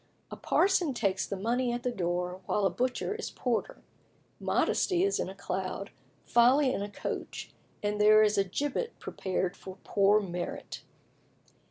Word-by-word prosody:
A -, -, -5 dB
parson 365 Hz, -8 st, +2 dB
takes 195 Hz, -4 st, 0 dB
the 200 Hz, -, -3 dB
money 240 Hz, +5 st, 0 dB
at 240 Hz, 0 st, -3 dB
the 250 Hz, -, 0 dB
door, 180 Hz, -2 st, -2 dB
while 205 Hz, -, +1 dB
a 190 Hz, -, +3 dB
butcher 255 Hz, -, -1 dB
is 450 Hz, -, -5 dB
porter. 245 Hz, -3 st, -2 dB, 0.6 s
Modesty 360 Hz, -1 st, +1 dB
is 400 Hz, 0 st, +1 dB
in -, -, -2 dB
a 190 Hz, -, -9 dB
cloud, 195 Hz, 0 st, -4 dB, 0.3 s
Folly 255 Hz, +3 st, +4 dB
in -, -, -2 dB
a 205 Hz, -, -3 dB
coach, 200 Hz, -, -5 dB, 0.3 s
and 210 Hz, 0 st, 0 dB
there 215 Hz, +1 st, +7 dB
is 210 Hz, 0 st, +3 dB
a 200 Hz, -, +3 dB
gibbet 290 Hz, -, -3 dB
prepared 185 Hz, -1 st, -2 dB
for 190 Hz, 0 st, -10 dB
poor 200 Hz, +1 st, +4 dB
Merit. 180 Hz, -3 st, -5 dB
210 Hz, 160 wpm, -30 LUFS, 190-255 Hz, 0.6 s, there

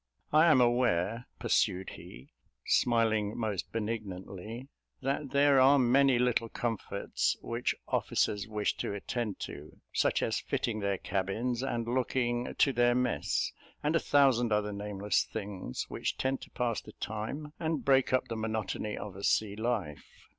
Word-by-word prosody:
I 155 Hz, +2 st, +6 dB
am 150 Hz, -5 st, +6 dB
aware," 120 Hz, -3 st, +2 dB
pursued 95 Hz, +1 st, +1 dB
he, 65 Hz, -, -12 dB, 0.3 s
smiling 110 Hz, -3 st, +2 dB
most 105 Hz, -5 st, -2 dB
benignantly, 110 Hz, +1 st, -5 dB, 0.4 s
"that 140 Hz, +1 st, -1 dB
there 140 Hz, 0 st, +5 dB
are 135 Hz, +2 st, +7 dB
many 130 Hz, +1 st, +4 dB
little 120 Hz, -2 st, +1 dB
comforts 115 Hz, -2 st, -2 dB
which 115 Hz, +1 st, -1 dB
officers 100 Hz, 0 st, 0 dB
wish 105 Hz, -1 st, -1 dB
to 100 Hz, -, -3 dB
attend 110 Hz, 0 st, -3 dB
to; 75 Hz, +2 st, -8 dB
such -, -, +2 dB
as -, -, 0 dB
fitting 110 Hz, -3 st, -2 dB
their 100 Hz, -1 st, 0 dB
cabins 105 Hz, +7 st, -2 dB
and 120 Hz, -3 st, -2 dB
looking 120 Hz, -1 st, 0 dB
to 140 Hz, -, +3 dB
their 120 Hz, 0 st, +3 dB
mess, 125 Hz, -11 st, 0 dB, 0.3 s
and 150 Hz, +2 st, +1 dB
a -, -, +5 dB
thousand 130 Hz, -6 st, +3 dB
other 105 Hz, 0 st, +1 dB
nameless 100 Hz, 0 st, 0 dB
things, 100 Hz, -, -5 dB
which -, -, -3 dB
tend 130 Hz, 0 st, -1 dB
to -, -, -10 dB
pass 120 Hz, -2 st, -1 dB
the 105 Hz, -, -13 dB
time 135 Hz, +8 st, -5 dB
and 160 Hz, -2 st, -2 dB
break 135 Hz, -1 st, +4 dB
up 130 Hz, 0 st, +2 dB
the 115 Hz, -, -4 dB
monotony 110 Hz, -1 st, -3 dB
of 100 Hz, -3 st, -7 dB
a 100 Hz, -, -9 dB
sea 105 Hz, -1 st, +2 dB
life. 110 Hz, -9 st, -3 dB
115 Hz, 150 wpm, -31 LUFS, 105-130 Hz, 0.4 s, are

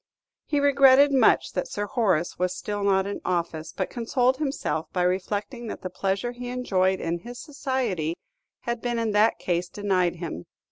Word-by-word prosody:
He 290 Hz, -, +1 dB
regretted 280 Hz, 0 st, +6 dB
much 265 Hz, -2 st, +3 dB
that -, -, -2 dB
Sir 205 Hz, -, -3 dB
Horace 200 Hz, -9 st, 0 dB
was 180 Hz, 0 st, +1 dB
not -, -, -8 dB
still 205 Hz, -1 st, -1 dB
in 200 Hz, +1 st, -5 dB
office, 165 Hz, -3 st, -2 dB
but 190 Hz, -, -3 dB
consoled 250 Hz, +2 st, +1 dB
himself 270 Hz, -, -2 dB
by 180 Hz, -, 0 dB
reflecting 205 Hz, +6 st, -2 dB
that -, -, -7 dB
the 185 Hz, -, -4 dB
pleasure 195 Hz, +6 st, -1 dB
he 245 Hz, 0 st, -7 dB
enjoyed 190 Hz, -7 st, +1 dB
in 170 Hz, +1 st, -2 dB
his 240 Hz, +6 st, -9 dB
society 250 Hz, -, -2 dB, 0.5 s
had 235 Hz, -1 st, -3 dB
been 240 Hz, -1 st, -1 dB
in 225 Hz, -2 st, 0 dB
that 210 Hz, +2 st, +3 dB
case 175 Hz, 0 st, -1 dB
denied 185 Hz, -4 st, 0 dB
him. 165 Hz, -, -6 dB
205 Hz, 175 wpm, -25 LUFS, 180-245 Hz, 0.5 s, regretted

